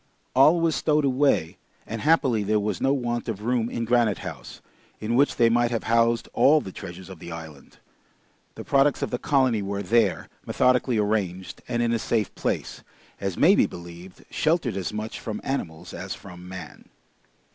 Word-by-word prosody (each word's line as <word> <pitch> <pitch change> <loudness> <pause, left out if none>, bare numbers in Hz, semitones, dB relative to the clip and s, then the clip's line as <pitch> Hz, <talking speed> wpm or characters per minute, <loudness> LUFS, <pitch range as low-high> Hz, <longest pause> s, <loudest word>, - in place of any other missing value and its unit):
All 150 +6 +6
was 165 -2 +1
stowed 150 0 +2
away, 130 - +1 0.3
and 115 -1 -5
happily 140 -8 +3
there 105 +1 +1
was 105 +1 -2
no 135 - +3
want 120 -4 -2
of 105 -2 -4
room 120 0 0
in 115 -1 -3
Granite 115 -4 +2
House, - - -8 0.4
in 110 +2 -2
which 140 +4 +3
they 115 - +4
might 120 +1 +2
have 115 -2 -2
housed 115 0 +2
all 155 +3 +5
the 95 - -8
treasures 90 +1 -9
of 95 -3 -11
the 85 - -9
island. 80 -4 -10 0.8
The - - -7
products 140 +1 +2
of - - -3
the 125 - -2
colony 130 -7 +2
were 100 0 -3
there, 110 0 +1 0.2
methodically 125 -1 +2
arranged, 100 -4 -2
and 120 -1 0
in 115 0 +1
a 115 - 0
safe 110 -2 -1
place, - - -3 0.4
as 95 -3 -3
may 175 +6 +6
be - - +4
believed, 85 +1 -11
sheltered 155 - +1
as 95 -2 -3
much 105 +1 -5
from 110 -2 -5
animals 85 -13 -4
as - - -5
from 90 0 -12
man. 95 0 -10
115 Hz, 180 wpm, -25 LUFS, 95-130 Hz, 0.8 s, All